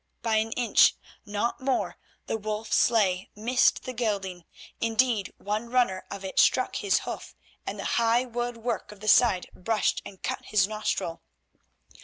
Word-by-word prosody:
By 225 -2 +2
an 220 +1 0
inch—not 230 -2 +1
more—the 260 -3 -3
Wolf 215 +1 -4
sleigh 195 -6 +3
missed 240 +4 +2
the 255 - -5
gelding. 195 -7 -2 0.3
Indeed, 230 -2 +1
one 215 +3 -3
runner 240 -7 +1
of 195 -1 -7
it 190 - -1
struck 255 - +3
his 200 -2 +1
hoof, - - -7 0.3
and - - -3
the - - -5 0.2
high 230 +2 +3
wood 240 0 -3
work 230 -3 -3
of 210 - -13
the 215 - -8
side 210 -4 +4
brushed 215 +3 0
and 190 - -12
cut - - -3
his 200 -3 +2
nostril. 210 -5 -3
220 Hz, 150 wpm, -27 LUFS, 200-235 Hz, 0.3 s, side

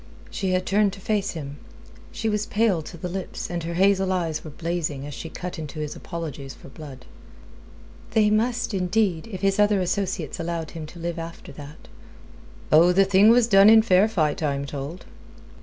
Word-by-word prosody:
She 190 - -2
had 185 0 0
turned 200 0 +2
to 200 - -10
face 205 0 -1
him. 145 -3 -7 0.5
She 225 - -3
was 210 -1 -1
pale 210 -6 +1
to 170 - -10
the 180 - -5
lips, 185 0 -5
and 175 -1 -2
her 170 +1 -4
hazel 190 +1 +3
eyes 165 -4 -2
were 155 - -8
blazing, 155 -3 -3
as 145 - -7
she 165 - -7
cut 180 0 -7
into 155 -1 -7
his 150 -1 -4
apologies 145 -5 -7
for - - -14
Blood. 135 -3 -11 1.0
"They 215 -1 +3
must, 230 +1 0
indeed, 185 -1 0
if 190 -5 -7
his 195 0 +1
other 205 -1 +4
associates 180 -3 -2
allowed 165 -1 -4
him 160 -2 -7
to 175 - -13
live 170 0 -4
after 165 0 -8
that." 145 +2 -12 0.8
"Oh, 165 +3 +6
the 195 +2 +4
thing 195 +2 +5
was 235 0 +5
done 200 -2 +7
in 220 0 +7
fair 195 -1 +4
fight, 155 -9 0
I 145 -3 0
am 140 0 -4
told." 140 +5 -7
180 Hz, 190 wpm, -24 LUFS, 155-200 Hz, 1.0 s, done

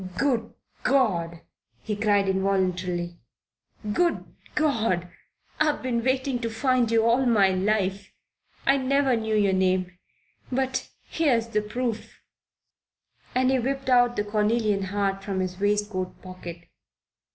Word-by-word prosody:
"Good 240 -4 0 0.3
God!" 175 -11 +1 0.4
he 215 - -2
cried 205 -2 +2
involuntarily. 185 -3 -1 0.7
"Good 345 +7 +1 0.3
God! 225 - +1 0.5
I've 305 -3 +1
been 235 -3 -1
wanting 260 0 0
to 230 -1 -2
find 245 +1 +1
you 225 0 +3
all 245 +3 +3
my 205 -5 +4
life. 195 0 0 0.5
I 275 - +4
never 270 0 +2
knew 220 -1 -1
your 200 -2 +3
name. 185 -1 +1 0.6
But 265 +1 -1
here's 245 -8 +1
the 210 -1 +1
proof." 230 +1 -4 1.2
And 255 +1 +3
he 265 - +2
whipped 270 +1 -2
out 245 -1 +4
the 205 - 0
cornelian 210 -1 +1
heart 195 0 -1
from 195 -1 -2
his 185 0 -3
waistcoat 205 -2 -1
pocket. 175 -2 -9
215 Hz, 125 wpm, -25 LUFS, 190-255 Hz, 1.2 s, my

